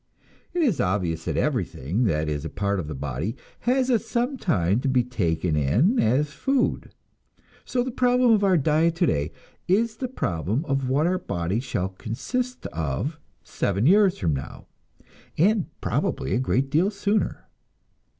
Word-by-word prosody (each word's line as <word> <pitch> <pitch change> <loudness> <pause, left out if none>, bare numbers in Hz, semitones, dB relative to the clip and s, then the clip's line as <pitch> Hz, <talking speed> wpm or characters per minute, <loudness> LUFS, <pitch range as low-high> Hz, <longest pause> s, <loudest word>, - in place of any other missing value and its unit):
It 350 -1 0
is 230 - +2
obvious 90 -4 -1
that - - -2
everything 90 - -1
that 80 -6 0
is 75 -1 -2
a 80 - -4
part 100 -1 -1
of 80 - -4
the 75 - -5
body 70 - -3 0.2
has 255 +1 +1
at 235 - +3
some 245 +4 -1
time 100 - +1
to 135 - -2
be 130 -2 +3
taken 85 -9 -1
in 115 - +2
as 145 +7 +2
food; 270 - 0 0.8
so 245 -1 0
the 260 - -4
problem 250 0 +3
of 210 -2 +4
our 190 -3 +4
diet 160 +3 +2
today 80 - +1 0.4
is 220 +4 +2
the 255 - -3
problem 105 - -2
of 135 -3 -1
what 140 +4 +2
our 180 +1 +1
body 85 - -2
shall 95 -7 -2
consist 240 - -4
of 80 - -2 0.2
seven 100 +3 -1
years 195 +3 +5
from 80 -5 0
now, 65 -1 -6 0.7
and 200 +3 +3
probably 65 - -1
a - - +2
great 130 +1 0
deal 170 +7 +3
sooner. 205 +1 -1
135 Hz, 160 wpm, -25 LUFS, -, 0.8 s, years